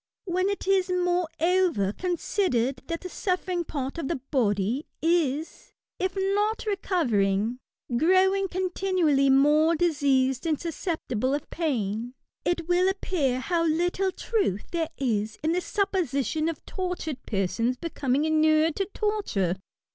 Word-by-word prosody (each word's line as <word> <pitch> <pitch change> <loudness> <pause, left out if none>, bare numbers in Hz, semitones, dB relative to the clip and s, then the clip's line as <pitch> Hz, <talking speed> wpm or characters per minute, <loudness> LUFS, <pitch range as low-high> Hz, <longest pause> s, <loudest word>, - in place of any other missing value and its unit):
When 370 +1 0
it 400 - -3
is, 385 -1 +3
moreover^ 355 - +1
considered 315 - 0
that 335 0 -3
the 365 - -5
suffering 365 -1 -1
part 280 0 -4
of 285 - -3
the 335 - -1 0.2
body 225 +1 +1
is, 320 -2 0 0.3
if 370 0 -1
not 410 +4 0
recovering, 240 - 0 0.4
growing 375 +7 +3
continuaUy 360 -6 +1
more 300 +4 +5
diseased 280 -4 +1
and 310 -3 +1
susceptible 300 - -2
of 290 - -5
pain, 240 - -2 0.3
it 345 -2 -1
wiU 360 +1 +3
appear 300 -10 -1
how 340 +3 0
little 355 +4 +1
truth 365 - -1
there 330 -2 -1
is 220 -5 -1
in 315 - +2
the 360 +2 +1
supposition 325 - 0
x)f 330 -2 -4
tortured 360 -7 -4
persons 230 +5 0
becoming 285 -2 -1
inured 315 0 +3
to 390 - +1
torture. 400 - 0
325 Hz, 125 wpm, -26 LUFS, 265-365 Hz, 0.4 s, more